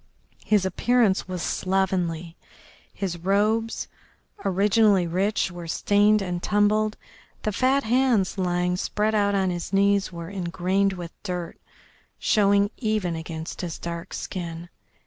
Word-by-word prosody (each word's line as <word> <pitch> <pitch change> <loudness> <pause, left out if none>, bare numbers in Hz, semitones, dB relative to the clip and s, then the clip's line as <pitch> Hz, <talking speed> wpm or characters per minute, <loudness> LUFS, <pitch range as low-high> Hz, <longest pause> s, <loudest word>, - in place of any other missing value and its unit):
His 210 -3 +2
appearance 210 +1 +2
was 180 -2 -4
slovenly, 180 -3 -1 0.6
his 180 -3 -4
robes, 210 +5 +1 0.6
originally 200 0 +3
rich, 190 +3 0
were 175 -1 -8
stained 205 +4 +3
and 175 -2 -3
tumbled, 210 +1 +2 0.5
the 215 - 0
fat 260 +6 +2
hands 240 -4 +2
lying 180 0 0
spread 210 +3 0
out 200 -1 +2
on 190 -2 +1
his 175 -1 -5
knees 200 0 +2
were 170 -1 -7
engrained 190 +1 0
with 175 -2 -7
dirt, 180 -4 -5 0.6
showing 200 0 +3
even 215 -7 -1
against 160 0 -6
his 175 -3 -4
dark 170 +1 -6
skin. 170 -1 -6
190 Hz, 125 wpm, -25 LUFS, 175-210 Hz, 0.6 s, originally